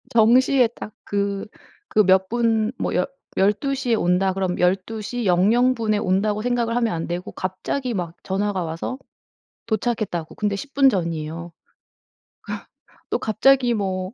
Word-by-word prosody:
정시에 250 +3 +5
딱 210 - -8
그 200 0 -2 0.4
그 215 - +3
몇 190 0 +4
분 225 -2 +1
뭐 - - -2
10 - - +2 0.3
12 210 +8 +2
시에 255 -4 0
온다 185 -1 +2
그러면 185 -1 -2
'12 195 +5 0
시 240 +2 -4
00 220 +8 +4
분에 220 -3 0
온다.'고 205 +2 +1
생각을 235 -1 0
하면 235 -4 +1
안 165 -1 -3
되고 175 +1 -4
갑자기 235 +7 -3
막 175 -4 -4
전화가 195 -1 -1
와서 165 +10 -4 0.7
"도착했다."고 215 -7 -2
근데 210 -1 -1
10 275 +8 -8
분 275 -1 +6
전이에요. 170 -4 -3 0.2
그 - - -36 1.4
또 - - +1
갑자기 245 +3 +3
뭐 190 -2 -2
210 Hz, 240 characters per minute, -22 LUFS, 185-235 Hz, 1.4 s, 분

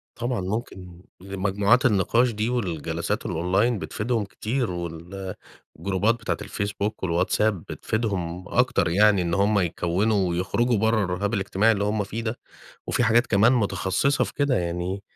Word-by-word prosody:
طبعًا، 120 -3 -2
ممكن 90 -3 -5 0.2
لمجموعات 100 +6 +1
النقاش 115 +3 +3
دي 110 +2 -2
والجلسات 90 - -2
الonline 95 +9 +1
بتفيدهم 110 +1 -2
كتير 115 +2 -2
والجروبات 95 +4 -4
بتاعة 115 -2 -3
الfacebook 100 0 -2
والWhatsApp 90 +5 +2 0.2
بتفيدهم 90 -6 -3
أكتر - - +2
يعني، 100 +2 +4
إن 85 -1 -1
هُم 100 +2 +3
يكوّنوا 90 +3 +1
ويخرجوا 100 +7 +1
برّه 110 0 +2
الرهاب 95 +4 -2
الاجتماعي 100 +2 +2
اللي 100 -2 0
هُم 105 0 0
فيه 110 +4 -5
ده. 115 +1 -3 0.5
وفي 125 - +1
حاجات 120 +2 +4
كمان 110 +4 +4
متخصصة 110 +3 +1
في - - -7
كده، 140 -3 +1
يعني 90 +3 -2
100 Hz, 135 wpm, -24 LUFS, 90-115 Hz, 0.5 s, يعني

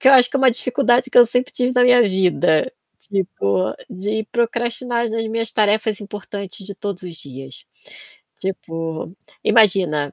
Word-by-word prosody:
que 265 - +5
eu - - +7
acho 250 -2 +7
que 275 - 0
é - - 0
uma 265 -1 +5
dificuldade 255 +1 +1
que - - +4
eu 240 - +8
sempre 245 +2 -1
tive 250 0 0
na 250 - +4
minha 245 -1 +6
vida, 185 - +1 0.3
tipo, 110 - -1 0.2
de 210 +4 -3
procrastinar 235 0 -1
as 235 - -2 0.2
minhas 230 0 -2
tarefas 215 0 +1
importantes 200 -1 -7
de 200 - -7
todos 200 -2 -6
os 180 -2 -8
dias. 135 -3 -10 0.7
Tipo, 165 -3 -5 0.3
imagina, 180 - +3
210 Hz, 160 wpm, -20 LUFS, 180-240 Hz, 0.7 s, eu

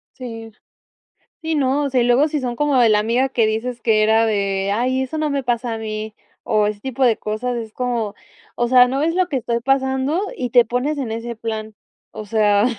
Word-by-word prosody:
Sí. 225 -3 -8 0.9
Sí, 320 0 -1
no, 280 0 +1
o 280 - -2
sea 255 -1 +2
y - - +2
luego 245 +5 +4
si 305 -1 -2
son 245 -2 -3
como 295 0 +1
de 235 - +5
la 210 -1 +4
amiga 235 +5 +1
que 235 -4 +1
dices 235 +3 -2
que 220 -2 +2
era 220 +1 +4
de: 200 -2 0
"Ay, 255 +4 0
eso 265 +4 -4
no 305 -1 0
me 280 -2 -2
pasa 240 -1 -1
a - - -5
mí", 215 0 -5 0.3
o 210 -1 +1
ese 210 -1 -3
tipo 265 +2 -1
de 235 -3 +3
cosas 235 +4 -3
es 225 -2 -6
como: 235 -4 -2 0.4
"O 240 - +1
sea, 250 0 +6
¿no 265 +2 -2
ves 325 +3 +1
lo 370 0 +1
que 290 - -2
estoy 235 -1 -1
pasando? 265 +4 0 0.2
Y 250 -2 -3
te 245 0 +6
pones 250 +6 -2
en 245 -5 -3
ese 230 +1 -5
plan". 220 -1 -5 0.4
O 215 - -8
sea, 210 -1 +3
240 Hz, 225 wpm, -20 LUFS, 220-265 Hz, 0.9 s, sea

